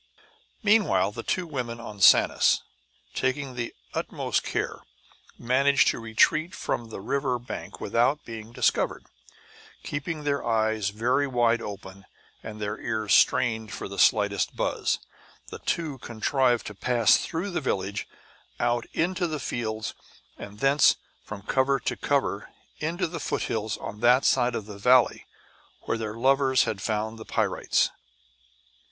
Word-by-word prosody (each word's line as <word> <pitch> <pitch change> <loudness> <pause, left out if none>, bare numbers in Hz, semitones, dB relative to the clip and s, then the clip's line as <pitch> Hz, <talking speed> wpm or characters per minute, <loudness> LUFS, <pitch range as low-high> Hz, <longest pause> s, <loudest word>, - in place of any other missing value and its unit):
Meanwhile 200 - +3
the 115 - -6
two 180 +8 -1
women 125 -7 -4
on 105 -4 -9
Sanus, - - +5 0.5
taking 130 +1 -1
the 120 -1 -4 0.2
utmost - - -1
care, - - -3 0.6
managed 130 +2 +3
to - - -2
retreat 115 +9 +2
from 115 -1 -3
the 110 - -7
river 130 +4 -1
bank 120 +1 -8
without 125 +6 +1
being 115 -1 -8
discovered. - - 0 0.8
Keeping 150 +2 -4
their 140 -1 0
eyes 110 -2 +1
very 125 +7 +1
wide 120 -2 +2
open 100 -2 -8 0.4
and 110 -1 -8
their 105 +1 -3
ears 110 -3 -1
strained 110 -4 +3
for - - -5
the 100 0 -7
slightest 100 -2 +3
buzz, - - 0 0.5
the - - -8
two 155 -6 -2
contrived 120 +1 0
to 105 - -6
pass 115 +2 +3
through 175 +5 -3
the 175 - -2
village, 100 -5 -2 0.5
out 120 0 0
into 175 +2 0
the 155 -2 -3
fields, 110 -4 -3 0.4
and 105 +1 -10
thence, 140 +2 +5 0.3
from 100 -2 -8
cover 135 +4 +1
to - - -2
cover, 135 -8 -1 0.3
into 165 +4 -1
the 170 0 -5
foothills 110 -1 -2
on 105 - -7
that 125 +3 +4
side 125 -2 +3
of 110 - -4
the 105 -1 -10
valley 125 +4 +4 0.5
where 115 - -2
their 110 -1 -4
lovers 130 +1 +3
had 100 -3 -3
found 110 +2 -2
the - - -7
pyrites. - - +1
120 Hz, 140 wpm, -26 LUFS, 110-135 Hz, 0.8 s, Sanus